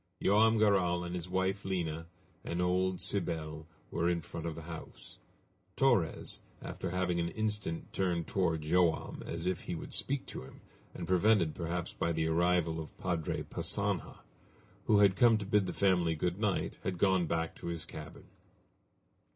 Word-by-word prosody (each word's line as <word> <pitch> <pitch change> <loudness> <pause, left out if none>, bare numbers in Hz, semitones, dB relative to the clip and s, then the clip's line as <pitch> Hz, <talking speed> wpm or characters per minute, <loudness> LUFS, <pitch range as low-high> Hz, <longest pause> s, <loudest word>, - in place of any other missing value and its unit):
Joam 110 +3 +4
Garral 95 -5 +3
and 85 0 -5
his 90 0 -4
wife, 95 +1 0
Lina, 85 -4 -2 0.4
and 85 - -3
old 90 +1 +1
Cybele, 80 -4 -1 0.2
were 85 +1 +1
in 85 -1 0
front 85 +1 -6
of 80 - -3
the 80 - -8
house. 80 0 -10 0.6
Torres, 120 -12 +2 0.2
after - - -5
having 90 -1 0
for 85 - +1
an - - -2
instant 105 -6 -2
turned 90 -3 0
toward 85 -3 0
Joam 85 +1 +1
as 85 0 -4
if 90 -2 0
he - - -4
would - - -7
speak 140 0 0
to - - -7
him, 65 - -13 0.3
and 85 - -5
prevented 95 -3 +4
perhaps 85 0 -3
by 85 - 0
the 80 -1 0
arrival 85 0 +2
of 80 - -8
Padre 85 -4 -1
Passanha, - - -3 0.6
who 110 - +5
had 100 -2 +6
come 115 +1 +6
to 105 - -4
bid 100 -1 +2
the - - -1
family 90 -4 +2
good 90 +4 -1
night, 105 -4 0
had 95 -2 -2
gone 95 -2 +3
back 80 0 -1
to - - -7
his 85 -2 -3
cabin. - - -9
90 Hz, 170 wpm, -32 LUFS, 85-95 Hz, 0.6 s, had